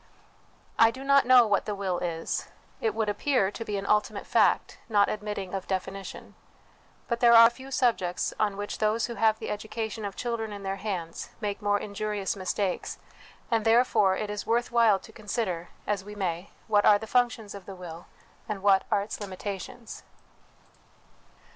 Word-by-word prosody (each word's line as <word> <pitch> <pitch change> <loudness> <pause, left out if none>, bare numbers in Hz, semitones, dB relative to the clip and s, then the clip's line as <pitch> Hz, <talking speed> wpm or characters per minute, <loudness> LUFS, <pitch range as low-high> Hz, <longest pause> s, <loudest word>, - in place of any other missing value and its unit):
I 225 - +8
do 260 +3 -7
not 275 -1 +4
know 250 -2 +8
what 205 -2 +1
the 210 - -3
will 190 -3 -2
is; 165 -2 -3 0.3
it 445 -2 0
would 220 -1 0
appear 205 -1 +1
to 230 - -6
be 210 -2 -3
an 195 - -4
ultimate 210 +1 +1
fact, - - +2
not 205 -2 +4
admitting 205 -3 -4
of 195 -1 -4
definition: 195 +1 -5 0.7
but 235 -1 -1
there 235 -1 +6
are 230 0 +9
few 265 +2 -11
sub 250 -3 +2
jects 180 -1 -2
on 205 -2 +1
which 205 0 -5
those 215 +1 +1
who 240 - -5
have 220 -1 +2
the - - -5
education 220 +1 -4
of 200 -1 -4
children 230 -3 -3
in 200 -1 -7
their 195 0 -3
hands 185 -5 -5
make 210 -1 -3
more 205 0 +2
injurious 205 -1 -3
mistakes; 190 0 -2 0.5
and 225 -1 +2
therefore 225 -4 +4
it 210 -1 -3
is 210 0 -4
worth 235 +2 +1
while 230 -4 +5
to - - -14
consider, 205 -5 -3 0.2
as 205 -2 -1
we 210 +1 -9
may, 180 -2 -3 0.2
what 205 -2 +3
are 205 - +7
the 220 - -7
functions 235 -3 0
of 200 -2 -10
the 195 - -7
will, 175 -2 -9 0.4
and 200 -2 -4
what 195 -1 +4
are 200 - +2
its 210 +1 -7
limitations. 205 +4 -6
210 Hz, 180 wpm, -27 LUFS, 195-230 Hz, 0.7 s, are